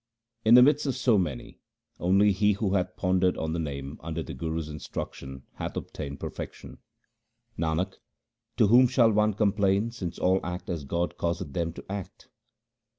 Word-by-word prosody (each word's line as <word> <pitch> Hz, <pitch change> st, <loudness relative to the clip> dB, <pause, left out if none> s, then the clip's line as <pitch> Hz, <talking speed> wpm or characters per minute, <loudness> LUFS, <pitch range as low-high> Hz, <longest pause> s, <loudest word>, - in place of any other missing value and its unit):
In 110 Hz, +2 st, +7 dB
the 125 Hz, -, +9 dB
midst 145 Hz, +2 st, +3 dB
of 135 Hz, -, 0 dB
so 120 Hz, -5 st, +3 dB
many, 75 Hz, -9 st, -4 dB, 0.4 s
only 100 Hz, +4 st, +4 dB
he 105 Hz, +2 st, +3 dB
who 100 Hz, -1 st, -1 dB
hath 90 Hz, -2 st, 0 dB
pondered 90 Hz, -1 st, +2 dB
on 80 Hz, 0 st, -2 dB
the 85 Hz, -, -2 dB
Name 70 Hz, -2 st, -5 dB
under 80 Hz, 0 st, -4 dB
the -, -, -7 dB
Guru's 80 Hz, +3 st, -3 dB
instruction 65 Hz, -3 st, -7 dB
hath -, -, -4 dB
obtained 70 Hz, 0 st, -6 dB
perfection. -, -, -7 dB, 0.8 s
Nanak, 85 Hz, +4 st, -1 dB, 0.6 s
to 115 Hz, -, +5 dB
whom 125 Hz, +5 st, +6 dB
shall 120 Hz, -2 st, +4 dB
one 105 Hz, -1 st, +2 dB
complain 100 Hz, +1 st, +2 dB
since 95 Hz, -8 st, -6 dB
all 95 Hz, +1 st, +2 dB
act 90 Hz, +1 st, -5 dB
as 80 Hz, -5 st, -4 dB
God 85 Hz, +5 st, -2 dB
causeth 85 Hz, -4 st, -2 dB
them 85 Hz, 0 st, -1 dB
to -, -, -10 dB
act 100 Hz, -2 st, -7 dB
90 Hz, 165 wpm, -27 LUFS, 80-105 Hz, 0.8 s, the